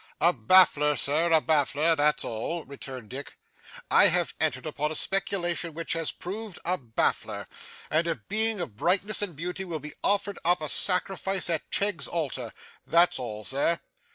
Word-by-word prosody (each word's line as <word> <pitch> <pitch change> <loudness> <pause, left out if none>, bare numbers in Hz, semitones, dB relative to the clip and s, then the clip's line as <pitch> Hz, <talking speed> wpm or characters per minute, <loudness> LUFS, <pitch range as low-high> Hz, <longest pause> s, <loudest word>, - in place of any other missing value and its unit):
'A 175 +1 +4
baffler, 150 +3 +4
Sir, 160 +4 0
a 160 - +6
baffler, 155 +1 +1
that's 150 0 +1
all,' 135 +9 -4
returned 130 -4 -9
Dick. 140 +2 -8 0.5
'I - - +7
have 175 -1 +2
entered 140 -4 -1
upon 150 0 -2
a - - -4
speculation 175 -4 -1
which 165 0 -1
has 165 -2 0
proved 205 +1 -7
a 180 +2 +2
baffler; 120 -9 -2 0.5
and 165 +2 +1
a 165 - 0
Being 220 +3 +1
of 130 -12 -5
brightness 195 - +1
and 190 -6 -2
beauty 180 +5 -4
will 170 -4 -4
be 150 +1 -8
offered 200 0 +1
up 175 +2 +4
a 155 -1 -4
sacrifice 190 0 +2
at 160 - -3
Cheggs's 200 -4 0
altar. 135 -8 -3 0.4
That's 170 -3 +4
all, 110 -4 -6
sir. 145 +5 +1
165 Hz, 165 wpm, -27 LUFS, 145-180 Hz, 0.5 s, I